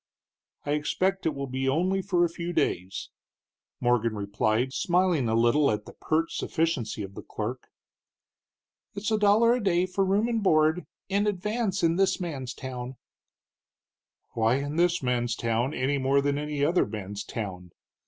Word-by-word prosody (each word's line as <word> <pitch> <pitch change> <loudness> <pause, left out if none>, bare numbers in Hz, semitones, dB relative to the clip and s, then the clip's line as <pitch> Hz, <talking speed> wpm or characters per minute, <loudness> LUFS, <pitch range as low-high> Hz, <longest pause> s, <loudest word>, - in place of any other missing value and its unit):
"I 145 - -1
expect 185 +6 0
it 155 - -1
will 140 0 -3
be 135 0 -1
only 185 +7 +1
for 180 -2 +2
a - - -1
few 170 +1 -5
days," 95 - -1 0.7
Morgan 120 -2 +1
replied, 110 +5 0
smiling 175 -8 +2
a 110 - +1
little 120 +6 +4
at 105 0 -2
the - - -11
pert 160 +1 -1
sufficiency 145 -11 -1
of 95 0 -8
the - - -8
clerk. 120 +4 -5 1.3
"It's 210 +2 -2
a 215 - +2
dollar 210 +3 +5
a 245 -2 -1
day 180 -2 +2
for 185 +1 0
board 195 +3 +2
and 230 -3 -1
room 155 +2 +3 0.2
in 200 +2 +1
advance 210 0 -1
in 165 0 +3
this 190 -1 +2
man's 135 -8 -4
town." 130 -1 -6 1.4
"Why 115 +1 +2
in 145 +2 -3
this 175 -2 +2
man's 120 -2 0
town, 115 +3 0
any 135 +3 0
more 135 +1 +3
than 140 0 0
any 150 -1 -1
other 175 +4 +2
man's 105 -1 -6
town?" 95 -6 -6
145 Hz, 165 wpm, -27 LUFS, 120-180 Hz, 1.4 s, dollar